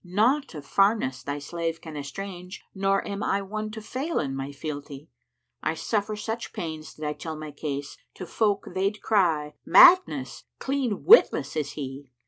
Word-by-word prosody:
naught 220 - +1
of 145 -2 -8
farness 195 - +2
thy 140 0 -4
slave 165 +3 -4
can 160 -2 -9
estrange 180 +6 -7
* - - -52
Nor 195 0 0
am 200 0 -4
I 200 -1 0
one 215 +2 -4
to 220 +1 -7
fail 275 +9 -3
in 135 -1 -1
my 135 +1 -4
fealty: 145 -1 -7 0.5
I 155 - -1
suffer 210 +3 -1
such 225 +2 -5
pains 160 -2 -6
did 155 - -6
I 150 - -1
tell 160 +1 -6
my 155 -1 -7
case 145 -1 -5
* - - -50
To 185 - -7
folk, 205 +2 0
they'd 195 +3 -1
cry, 165 -8 +2
'Madness! 150 - +6
clean 265 -7 -2
witless 455 - +6
is 145 -2 -2
he!' 135 -1 -7
175 Hz, 175 wpm, -26 LUFS, 145-210 Hz, 0.5 s, Madness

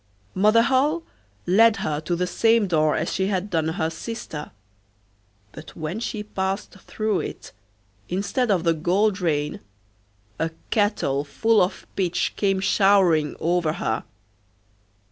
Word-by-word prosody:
Mother 215 +4 +4
Holle 290 +7 +2 0.4
led 225 +4 +5
her 150 -5 -1
to 175 +2 -2
the 180 +1 0
same 225 +4 +3
door 155 -4 +2
as 160 - -2
she 190 +1 0
had 195 0 -2
done 160 -2 +1
her 160 0 -1
sister, 165 -5 -6 1.0
but - - -12
when 160 +6 -4
she 215 -2 -4
passed 195 0 -3
through 210 +1 -2
it, - - -7 0.6
instead 205 +7 -1
of 185 -5 +2
the 165 -1 +3
gold 185 +5 +1
rain 150 -4 -1 0.8
a 165 - 0 0.2
kettle 205 -10 +1
full 225 +9 +2
of 185 +1 -1
pitch 180 -3 0
came 195 -2 +1
showering 190 -6 +3
over 170 -2 +1
her. 110 -7 -2
190 Hz, 135 wpm, -23 LUFS, 160-210 Hz, 1.0 s, led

